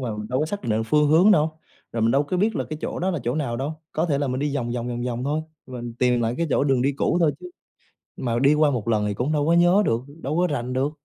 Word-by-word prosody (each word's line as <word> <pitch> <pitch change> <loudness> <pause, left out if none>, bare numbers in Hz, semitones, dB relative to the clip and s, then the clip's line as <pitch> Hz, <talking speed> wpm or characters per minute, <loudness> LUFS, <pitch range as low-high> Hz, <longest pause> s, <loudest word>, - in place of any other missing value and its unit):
mà 115 -5 -3
mình 105 0 -6
đâu 125 - 0
có 155 - 0
xác 205 +5 -5
định 110 -1 0
phương 150 +4 +3
hướng 170 +7 +6
đâu, 155 -4 +2 0.3
rồi 115 - -1
mình 115 - +3
đâu 135 +3 +3
có 150 +5 -3
biết 210 +4 +1
là - - -1
cái 155 - -4
chỗ - - -4
đó 185 +2 0
là 170 - -2
chỗ 120 +2 0
nào 135 -6 -2
đâu. 140 +5 -3 0.2
Có 160 +3 0
thể 140 -4 0
là 145 - -1
mình 130 +1 -2
đi 145 0 -1
vòng 120 -3 -2
vòng, 120 0 -3
vòng 120 0 -3
vòng 125 0 -3
thôi 150 +3 0 0.3
và 125 -2 -7
mình 120 -1 -7
tìm 125 -1 +2
lại 115 0 0
cái 170 - 0
chỗ 135 - +2
đường 135 -3 +2
đi 140 +2 +1
cũ 140 +4 0
thôi 160 -3 +3
chứ, 360 - -9 0.7
mà 120 -2 -1
đi 140 +3 +5
qua 150 -1 +3
một 120 -5 -3
lần 110 -2 +1
thì 105 - -1
cũng 125 +8 -2
đâu 150 -2 +1
có 170 - +4
nhớ 175 +4 +5
được, 115 +1 +1 0.2
đâu 145 +4 -2
có 180 +1 +3
rành 125 -1 -3
được, 135 +3 0
140 Hz, 315 wpm, -23 LUFS, 120-155 Hz, 0.7 s, hướng